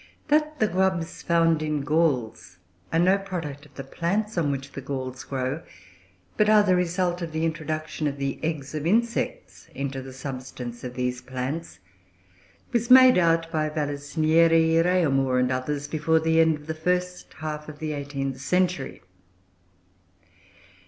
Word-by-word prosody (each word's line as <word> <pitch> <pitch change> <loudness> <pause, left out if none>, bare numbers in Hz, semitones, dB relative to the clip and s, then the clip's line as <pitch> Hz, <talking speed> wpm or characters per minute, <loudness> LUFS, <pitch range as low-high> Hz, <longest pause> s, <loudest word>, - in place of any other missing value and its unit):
That 305 +1 +2
the 215 - +3
grubs 185 -3 -1
found 165 -2 +2
in 155 -1 -1
galls 140 - 0 0.3
are 165 - +1
no 185 +4 +4
product 160 -7 -6
of - - -27
the 135 - -6
plants 195 - -2
on 165 -5 +1
which 135 0 -4
the 140 - -7
galls 130 -1 -5
grow, 135 +3 -3 0.8
but 210 0 +3
are 215 -1 +6
the 185 -2 +3
result 180 0 0
of 165 -2 -5
the 160 +1 0
introduction 155 -1 -3
of 140 -1 -3
the 140 -1 -3
eggs 155 -3 -3
of 155 +1 -2
insects 235 - -1
into 135 -1 -3
the 130 0 -9
substance 125 -2 -7
of 125 -1 -6
these 125 0 -2
plants, 130 +6 -5 0.9
was 235 -1 0
made 255 -4 +8
out 165 -1 +2
by 155 -1 0
Vallisnieri, 160 +2 +2
Réaumur, 135 -8 +2
and 125 0 +1
others, 140 +3 -2
before 160 +1 +1
the 160 0 +2
end 160 -1 +4
of 150 0 -12
the 160 - -3
first 180 +3 -2
half 150 -1 -5
of 150 - -9
the 155 0 -3
eighteenth 140 -2 -4
century. 180 - -1
155 Hz, 155 wpm, -25 LUFS, 140-175 Hz, 0.9 s, made